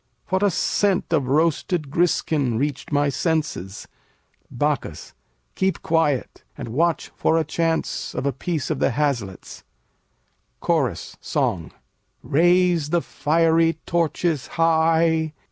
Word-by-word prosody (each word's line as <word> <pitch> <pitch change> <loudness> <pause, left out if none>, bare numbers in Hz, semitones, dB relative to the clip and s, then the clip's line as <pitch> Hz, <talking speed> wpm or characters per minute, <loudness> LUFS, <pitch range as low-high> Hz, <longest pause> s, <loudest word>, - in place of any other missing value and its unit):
What 190 +1 +1
a 205 - +4
scent 190 0 0
of 140 -5 +1
roasted 155 +1 0
griskin 150 -7 +1
reached 145 +3 -3
my 145 0 +2
senses! 140 - -2 0.6
Bac. - - 0 0.7
Keep 190 -2 -1
quiet 155 -5 0
and - - -6
watch 165 +7 0
for 160 - +2
a 165 - +2
chance 165 +1 -2
of 125 - -3
a 140 - +1
piece 155 0 -3
of - - -2
the - - +2
haslets. 120 -9 -3 1.0
CHORUS 135 - -1
[song] 85 -4 -1 0.5
Raise 175 0 +3
the 170 +1 +2
fiery 165 +1 +2
torches 165 -3 0
high! 160 -1 +2
160 Hz, 115 wpm, -22 LUFS, 140-170 Hz, 1.0 s, a